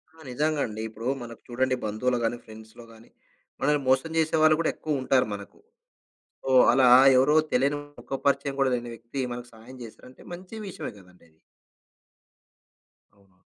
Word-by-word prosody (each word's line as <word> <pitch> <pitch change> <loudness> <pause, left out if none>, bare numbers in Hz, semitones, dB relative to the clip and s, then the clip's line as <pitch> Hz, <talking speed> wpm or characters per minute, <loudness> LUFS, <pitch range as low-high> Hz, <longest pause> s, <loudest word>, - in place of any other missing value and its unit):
ఆ! - - -22
నిజంగా 150 +3 0
అండి. 110 0 -7
ఇప్పుడు 110 +2 -7
మనకు 115 -1 -10
చూడండి 130 +1 0
బంధువులు 120 +4 -1
గాని, 115 +1 -1
ఫ్రెండ్స్‌లో‌‌ 110 +1 -13
గాని 110 +1 -18 0.5
మనల్ని 150 +1 +2
మోసం 130 +5 +2
చేసేవాళ్ళు 155 -1 +3
కూడా 165 - +1
ఎక్కువ 150 -4 -3
ఉంటారు 130 -1 +2
మనకు. 100 0 -10 0.9
ఓహ్, 130 -1 +7
అలా 130 +1 +4 0.3
ఎవరో 135 +4 +4 0.2
తెలియని 140 +3 +1 0.2
ముఖ 120 - -16 0.2
పరిచయం 140 0 0
కూడా 135 -1 +2
లేని 120 -1 -6
వ్యక్తి, 115 +4 -8
మనకు 120 0 -8
సహాయం 115 +4 -14
చేసారంటే 125 +3 -14
మంచి 180 +4 -10
విషయమే 190 - -6
కదండీ 90 -2 -21
అది. 80 0 -33 1.8
అవును. 95 -2 -29
125 Hz, 150 wpm, -26 LUFS, 115-140 Hz, 1.8 s, ఓహ్